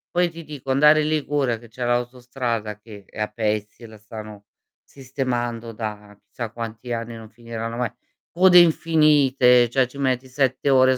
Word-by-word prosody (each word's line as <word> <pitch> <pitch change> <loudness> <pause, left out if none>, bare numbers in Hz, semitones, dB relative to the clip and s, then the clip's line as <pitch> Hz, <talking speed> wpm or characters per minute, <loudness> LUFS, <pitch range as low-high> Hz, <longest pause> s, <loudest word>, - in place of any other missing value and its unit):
Poi 175 -1 +2
ti 165 0 -10
dico 140 -3 -6
andare 150 +3 +5
in - - -1
Liguria, 145 -6 0
che 120 - -15
c'è 120 +2 -5
l'autostrada 120 -3 -2
che 105 -2 -13
è - - -13
a 105 - 0
pezzi 105 0 -3
e - - -8
la 110 -1 -13
stanno 105 -1 -10 0.4
sistemando 120 -4 -4
da 105 -2 -7
chissà 120 -2 -6
quanti 115 +1 -7
anni, 115 0 -4
non 110 -1 -11
finiranno 115 0 -6
mai; 120 -3 -1 0.4
code 180 +1 +6
infinite, 145 -7 +4
cioè 130 0 +2
ci 140 +3 -12
metti 130 -1 0
7 130 +1 0
ore 130 -1 +5
120 Hz, 170 wpm, -22 LUFS, 115-135 Hz, 0.4 s, code